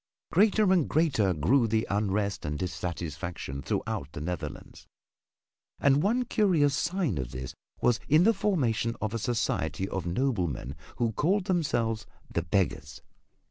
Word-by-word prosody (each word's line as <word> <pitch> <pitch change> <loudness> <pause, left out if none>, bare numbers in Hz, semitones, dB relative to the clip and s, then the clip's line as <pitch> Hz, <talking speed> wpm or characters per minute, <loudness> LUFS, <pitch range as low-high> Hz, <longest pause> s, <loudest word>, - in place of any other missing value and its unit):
Greater 205 +1 +4
and 175 -6 +2
greater 135 - +2
grew 105 - +3
the 110 +1 +1
unrest 100 0 -1
and 75 0 -3
dissatisfaction 85 -5 -4
throughout 70 +1 -3
the - - -5
Netherlands. 90 +3 -6 0.9
And 140 +1 +4
one 235 +7 +1
curious 175 - +3
sign 160 - 0
of 65 -2 -3
this 65 +1 -6 0.3
was 120 -3 +3
in 155 +4 +6
the 225 +4 +5
formation 130 - 0
of 110 0 -2
a 115 - -1
society 110 -4 -1
of 95 -3 -4
noblemen 85 - -1 0.2
who 115 -1 0
called 180 - +1
themselves 120 - 0 0.3
"The 85 - +1
Beggars." 80 -5 -1
110 Hz, 140 wpm, -28 LUFS, -, 0.9 s, in